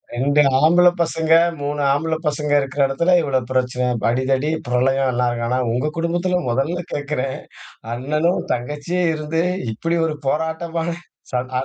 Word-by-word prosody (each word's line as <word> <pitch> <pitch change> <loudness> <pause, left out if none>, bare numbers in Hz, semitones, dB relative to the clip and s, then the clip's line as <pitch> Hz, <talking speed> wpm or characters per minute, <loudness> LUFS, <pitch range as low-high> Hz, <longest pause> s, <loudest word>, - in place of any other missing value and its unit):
2 140 +4 +3 0.2
ஆம்பள 175 +4 +5
பசங்க, 160 -1 -1 0.3
3 145 +1 -2
ஆம்பள 160 +3 -1
பசங்க 150 0 -1
இருக்குற 135 +1 -3
எடத்துல, 170 +7 +1
இவ்ளோ 140 -4 0
பிரச்சன, 125 -1 0 0.2
அடிதடி, 130 +4 0 0.2
பிரளயம்லாம்இருக்கு. 125 -1 +1
ஆனா 125 - 0
உங்க 125 +6 0
குடும்பத்துல 175 +2 0
முதல்ல 140 +9 -1
கேட்குறேன், 145 -2 -2 0.6
அண்ணனும் 150 +8 0
தங்கச்சியும் 150 +7 -1
இருந்து 155 +1 -2 0.3
இப்டி 165 +10 -1
ஒரு 155 -2 -2
போராட்டமான, 160 +3 -2 0.4
சா 125 - -3
அந் 130 +1 -11
145 Hz, 130 wpm, -20 LUFS, 130-165 Hz, 0.6 s, ஆம்பள